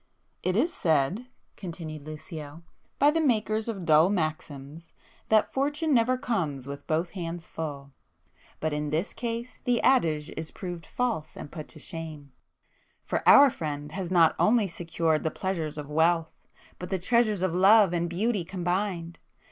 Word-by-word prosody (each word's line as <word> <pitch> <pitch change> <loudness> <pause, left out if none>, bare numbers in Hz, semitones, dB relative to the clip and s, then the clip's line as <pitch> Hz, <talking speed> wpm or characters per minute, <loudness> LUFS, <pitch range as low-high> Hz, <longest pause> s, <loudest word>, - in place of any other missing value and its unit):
"It 185 0 0
is 315 +11 +2
said"—continued 165 - -3
Lucio, 155 0 -8 0.3
"by 290 +1 +5
the 325 +1 +1
makers 220 -5 +1
of 195 -6 -4
dull 160 +2 +5
maxims, 155 -3 -4 0.4
that 215 -1 +3
'Fortune 290 +3 0
never 250 +1 +3
comes 175 - -2
with 140 0 -8
both 165 +2 0
hands 170 -2 -5
full'—but 145 +1 -8
in 150 0 -2
this 160 +6 -1
case 235 +1 -5
the 245 -2 +2
adage 160 - +2
is 160 - -4
proved 175 -4 -7
false 235 -11 -2
and 145 - -8
put 155 -3 -7
to 155 - -12
shame,—for 155 -4 -8
our 280 -1 +9
friend 150 -4 -5
has 185 0 -4
not 170 -3 +4
only 215 -1 +4
secured 165 -2 -1
the 160 - 0
pleasures 160 -4 -3
of 150 0 -7
wealth, 165 +1 +2 0.5
but 180 - -6
the 190 - 0
treasures 215 0 +2
of 185 -3 0
love 195 +1 +6
and 170 0 0
beauty 200 +3 0
combined. 175 -1 -3
170 Hz, 150 wpm, -27 LUFS, 155-215 Hz, 0.5 s, our